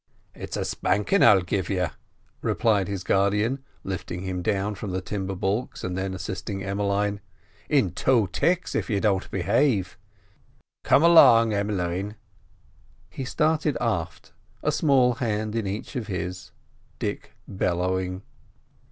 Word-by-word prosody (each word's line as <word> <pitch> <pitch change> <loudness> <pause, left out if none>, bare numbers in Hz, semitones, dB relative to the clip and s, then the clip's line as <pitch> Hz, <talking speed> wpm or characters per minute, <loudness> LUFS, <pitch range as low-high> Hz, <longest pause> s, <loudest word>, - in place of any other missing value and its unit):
"It's - - -6
a - - -2
spankin' 105 - +1
I'll 100 -5 +6
give 95 0 -2
you," 90 -4 0 0.5
replied 105 -5 +1
his 100 -2 -4
guardian, 105 +8 +1 0.2
lifting 90 -1 -5
him 95 -1 -3
down 100 +3 0
from 105 0 -6
the 95 0 -2
timber 95 +1 -4
baulks, 100 +6 -2
and 90 -1 -3
then 95 0 -3
assisting 95 +2 -5
Emmeline, 100 +1 -1 0.5
"in - - +3
two 120 -6 +2
ticks 175 - 0
if - - -2
you 105 -3 +1
don't 100 -3 0
behave. 100 0 +1 0.8
Come 145 - +4
along, 125 -10 +7
Em'line." 100 -1 -2 1.0
He 135 - -5
started 155 +1 +1
aft, 85 -9 -3 0.3
a - - +2
small 130 -5 +3
hand 110 -3 -2
in 110 -3 -1
each 105 +8 -5
of 120 -5 -3
his, 90 -2 -5 0.5
Dick - - -4
bellowing. 90 0 -1
100 Hz, 135 wpm, -25 LUFS, 95-115 Hz, 1.0 s, along